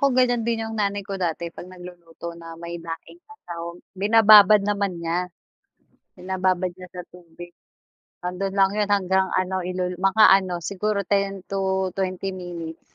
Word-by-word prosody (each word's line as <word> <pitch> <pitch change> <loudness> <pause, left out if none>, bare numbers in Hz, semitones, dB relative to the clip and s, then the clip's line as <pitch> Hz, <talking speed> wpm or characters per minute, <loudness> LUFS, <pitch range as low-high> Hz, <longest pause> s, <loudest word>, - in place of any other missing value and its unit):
ko 275 -3 +2
ganiyan 245 -2 +3
din 225 -1 -1
yung 220 -1 -4
nanay 200 -1 -1
ko 195 -2 -6
dati 170 0 -2
'pag 180 - -10
nagluluto 175 -2 -10
na 165 -1 -11
may 170 0 -7
daing 165 - -9
na 435 - -14
sahog, 170 0 -7 0.2
binababad 210 0 +7
naman 200 -3 -1
niya, 170 +2 -2 0.9
binababad 185 -1 -1
niya 180 0 -12
sa 180 0 -9
tubig, 175 0 -13 0.7
'ando'n 190 +2 -3
lang 195 0 +4
'yun 210 0 0
hanggang 190 -1 +2
ano 185 0 0
ilu 180 0 -3
mga 195 +3 +4 0.2
ano 180 -3 -5
siguro 200 +2 -1
10 195 0 -1
to 190 -1 0
20 190 0 -2
minutes 175 -3 -8
185 Hz, 160 wpm, -23 LUFS, 175-200 Hz, 0.9 s, binababad